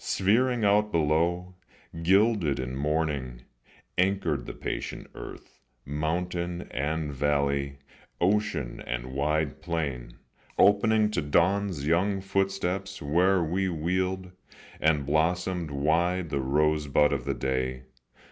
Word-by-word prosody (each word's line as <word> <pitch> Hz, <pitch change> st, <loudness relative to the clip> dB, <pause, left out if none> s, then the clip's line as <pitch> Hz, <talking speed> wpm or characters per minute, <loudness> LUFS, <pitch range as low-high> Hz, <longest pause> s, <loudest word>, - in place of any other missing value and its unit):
Sphering 115 Hz, +4 st, +2 dB
out 105 Hz, +1 st, +3 dB
below, 85 Hz, +3 st, +1 dB, 0.5 s
Gilded 95 Hz, -, +3 dB
in 65 Hz, 0 st, -4 dB
morning, 70 Hz, -4 st, -2 dB, 0.6 s
anchored 90 Hz, -8 st, +1 dB
the -, -, -5 dB
patient -, -, -5 dB
earth, -, -, -10 dB, 0.3 s
Mountain 85 Hz, +4 st, -2 dB
and 75 Hz, +2 st, -2 dB
valley, 70 Hz, 0 st, 0 dB, 0.4 s
ocean 95 Hz, -, 0 dB
and -, -, -4 dB
wide 75 Hz, +1 st, -1 dB
plain, 70 Hz, -8 st, -3 dB, 0.4 s
Opening 105 Hz, +1 st, +4 dB
to -, -, 0 dB
dawn's 85 Hz, +1 st, +1 dB
young 95 Hz, +5 st, +2 dB
footsteps 95 Hz, -1 st, -2 dB
where 90 Hz, +5 st, +2 dB
we 95 Hz, +4 st, 0 dB
wheeled, 90 Hz, +3 st, -1 dB, 0.5 s
And 75 Hz, -3 st, +2 dB
blossomed 85 Hz, +3 st, 0 dB
wide 80 Hz, +4 st, 0 dB
the 70 Hz, -2 st, 0 dB
rosebud 75 Hz, +1 st, +2 dB
of 65 Hz, -3 st, -3 dB
the -, -, -1 dB
day. 65 Hz, -1 st, -2 dB
80 Hz, 110 wpm, -27 LUFS, 70-95 Hz, 0.6 s, Opening